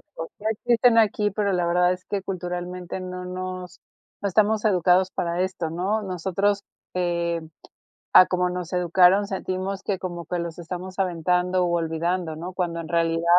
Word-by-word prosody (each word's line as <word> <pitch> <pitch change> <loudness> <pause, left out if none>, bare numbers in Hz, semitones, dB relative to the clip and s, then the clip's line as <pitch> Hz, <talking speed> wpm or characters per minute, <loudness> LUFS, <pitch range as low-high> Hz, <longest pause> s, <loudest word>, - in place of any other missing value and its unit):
o 165 - -4
o - - -12
sea, 215 +1 -2
existen 235 +1 +3
aquí, 210 -1 +2
pero 200 0 0
la 180 -2 +1
verdad 180 +1 +3
es 180 0 -10
que 200 -1 -2
culturalmente 180 -1 -5
no 180 0 -6
nos 185 0 -6 0.4
no 200 - 0
estamos 215 +3 +2
educados 185 -1 +3
para 170 +1 -1
esto, 185 -3 -2
¿no? 190 +6 0
Nosotros, 195 +2 0 0.3
eh, 170 -2 0 0.7
a 185 - +9
como 180 0 +1
nos 180 -1 -5
educaron, 180 +3 +4
sentimos 190 0 -3
que 195 -2 -2
como 175 -2 -5
que 175 - -2
los 170 -1 -5
estamos 180 +2 -7
aventando 180 0 +1
u 175 - 0
olvidando, 165 0 -1
¿no? 175 +4 -6
Cuando 175 -2 -2
en 165 - -7
realidad 165 -1 +1
180 Hz, 170 wpm, -24 LUFS, 175-190 Hz, 0.7 s, a